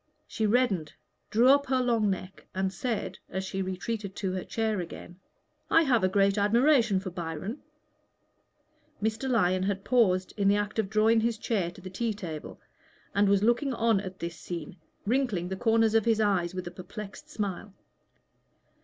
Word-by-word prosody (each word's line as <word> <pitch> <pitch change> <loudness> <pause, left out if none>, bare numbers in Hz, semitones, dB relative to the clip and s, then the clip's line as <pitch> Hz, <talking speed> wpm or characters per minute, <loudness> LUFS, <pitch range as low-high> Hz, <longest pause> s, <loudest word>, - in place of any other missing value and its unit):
She 220 -2 -1
reddened, 205 -9 +1 0.4
drew 235 +4 +4
up 280 +1 +5
her 260 0 +2
long 230 -4 +2
neck, 190 0 -5
and 190 0 -1
said, 195 -2 -3
as 190 - -3
she 190 0 -3
retreated 195 +1 -4
to 190 -2 -2
her 185 0 -3
chair 220 -3 -1
again 175 +1 -8 0.5
"I 330 - +5
have 245 -8 +2
a 185 - +4
great 200 +1 +3
admiration 235 0 +4
for 185 -1 -6
Byron." 175 - -5 1.4
Mr. 220 +5 -1
Lyon 185 -6 +2
had 195 0 -1
paused 190 -7 +2
in 200 -1 +2
the 200 - +5
act 205 +1 -2
of 205 -3 0
drawing 220 +2 +4
his 230 0 0
chair 205 -6 -1
to 175 +2 -13
the 185 0 -8
tea 225 +2 -2
table, 165 -7 -7 0.5
and 200 0 +3
was 200 0 +3
looking 240 +4 +2
on 225 -3 +3
at 190 -1 -7
this 170 -2 -5
scene, 170 +1 -7 0.3
wrinkling 215 -7 0
the 190 - -2
corners 225 +1 +3
of 225 -2 +3
his 225 -2 +3
eyes 190 -5 +1
with 185 - -4
a 175 - -6
perplexed 195 +3 -9
smile. 205 0 -4
205 Hz, 175 wpm, -28 LUFS, 185-225 Hz, 1.4 s, up